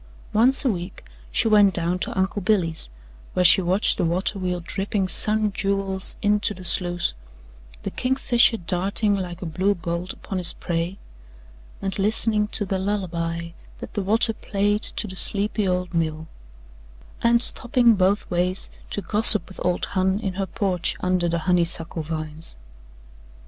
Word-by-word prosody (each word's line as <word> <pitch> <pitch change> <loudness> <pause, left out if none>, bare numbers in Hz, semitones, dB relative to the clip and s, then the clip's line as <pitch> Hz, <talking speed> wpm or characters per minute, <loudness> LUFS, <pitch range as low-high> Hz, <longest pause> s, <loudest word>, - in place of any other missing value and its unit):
Once 255 +6 +7
a 255 - +3
week 180 -1 -7 0.3
she - - +1
went 205 -3 +4
down 175 +1 -2
to - - -4
Uncle 190 +2 -1
Billy's, 175 - -1 0.4
where 180 - +1
she 180 - +6
watched 185 +4 +1
the - - +1
water 180 +4 -1
wheel 180 -1 -3
dripping 195 +2 -3
sun 215 +2 +5
jewels 195 -1 0
into 210 0 +1
the 185 - -11
sluice, 175 - -1 0.7
the - - -4
kingfisher 245 -2 +2
darting 195 +3 -1
like 180 -2 -6
a - - -5
blue 185 +5 -1
bolt 170 +1 -5
upon 190 - -6
his 175 - +2
prey, 170 +2 -4 0.9
and 195 +1 -3
listening 210 +1 +1
to 210 - -1
the 190 0 -3
lullaby 170 -4 -3 0.3
that - - -10
the 205 - -2
water 225 +4 +1
played 205 0 -2
to - - -1
the 190 -2 -8
sleepy 205 +1 +1
old 180 -1 -2
mill 160 -1 -2 1.0
and 235 +1 +3
stopping, 240 -1 +2
both 195 +1 0
ways, 180 +2 -2 0.2
to 205 - -4
gossip 215 +3 +7
with 190 - -10
old 180 0 -1
Hon 190 0 +1
in 195 -4 -4
her 195 +1 -4
porch 190 -6 -2
under 180 -1 0
the 170 - -1
honeysuckle 170 -2 0
vines. 155 - -7
190 Hz, 155 wpm, -22 LUFS, 175-205 Hz, 1.0 s, Once